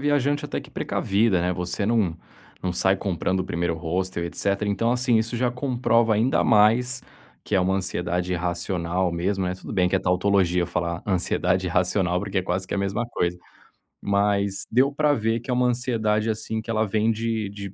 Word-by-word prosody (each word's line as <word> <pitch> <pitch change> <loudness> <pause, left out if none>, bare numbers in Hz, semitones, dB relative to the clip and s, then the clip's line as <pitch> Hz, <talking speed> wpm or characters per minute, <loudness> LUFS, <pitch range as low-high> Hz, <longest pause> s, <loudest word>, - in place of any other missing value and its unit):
viajante 145 0 +1
até - - -3
que - - -14
precavida, 100 -2 +1
né, 90 +1 0
você 90 +3 -2
não 105 -8 +1 0.4
não 90 -1 -2
sai 95 +2 +2
comprando 95 -1 -1
o - - -2
primeiro 85 -2 -1
hostel, 85 +1 -2
etcétera. 100 +4 -1
Então 110 +4 +1
assim, 125 -1 +2
isso 115 +2 0
já 125 +1 +1
comprova 120 -3 +1
ainda 115 +5 +2
mais 120 +3 +3 0.4
que - - -2
é 95 - +4
uma 95 +1 +1
ansiedade 90 -1 -2
racional 90 0 -1
mesmo, 95 +3 -1
né, 90 - -2
tudo 95 - -9
bem 90 -1 +2
que 95 - +2
é - - +2
tautologia 90 -1 +2
falar 85 0 -3
ansiedade 90 -1 +1
racional, 90 +1 +1
porque 100 0 -2
é - - 0
quase 95 +1 -2
que - - -2
a - - -1
mesma 100 +4 -1
coisa, 90 -6 -2 0.6
mas 100 -1 0
deu 130 +4 +3
para 150 +1 +2
ver 115 -3 0
que 120 - -14
é - - +2
uma 125 0 +2
ansiedade 115 -3 0
assim, 110 0 -3
que 110 - -14
ela 110 -1 +1
vem 110 +2 +1
de 110 -2 -2
de 100 -1 -8
100 Hz, 195 wpm, -24 LUFS, 90-115 Hz, 0.6 s, é